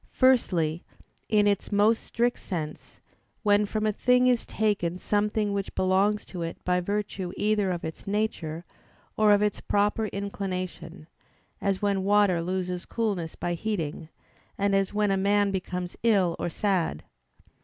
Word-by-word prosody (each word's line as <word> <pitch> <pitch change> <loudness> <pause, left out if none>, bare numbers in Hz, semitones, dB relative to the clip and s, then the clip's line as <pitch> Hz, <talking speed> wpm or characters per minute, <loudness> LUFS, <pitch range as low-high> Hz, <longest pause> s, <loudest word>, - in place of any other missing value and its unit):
Firstly, 180 - +2 0.5
in 210 -1 +4
its 200 0 0
most 210 +2 +3
strict 240 +1 0
sense, 155 -5 -6 0.4
when 205 -1 +3
from 215 +1 -2
a 215 - +3
thing 250 +4 +3
is 250 -2 +2
taken 200 -5 0
something 210 +1 0
which 200 -1 -3
belongs 195 +3 +2
to 180 - -7
it 165 0 -4
by 180 0 +2
virtue 200 -1 -3
either 210 -2 +1
of 175 -2 -3
its 160 +4 -7
nature, 180 -6 -2 0.5
or 215 -1 +4
of 205 0 +5
its 210 - -1
proper 210 +2 +1
inclination: 185 -4 -5 0.6
as 195 0 -1
when 200 -2 +1
water 200 -3 +3
loses 180 0 -3
coolness 200 -8 -2
by 175 - -2
heating, 170 -5 -3 0.5
and 200 0 +1
as 195 -1 +2
when 210 -1 +1
a 195 - +2
man 200 +1 +2
becomes 180 -1 -4
ill 195 -7 +3
or - - -1
sad. 175 - -1
200 Hz, 150 wpm, -27 LUFS, 180-210 Hz, 0.6 s, of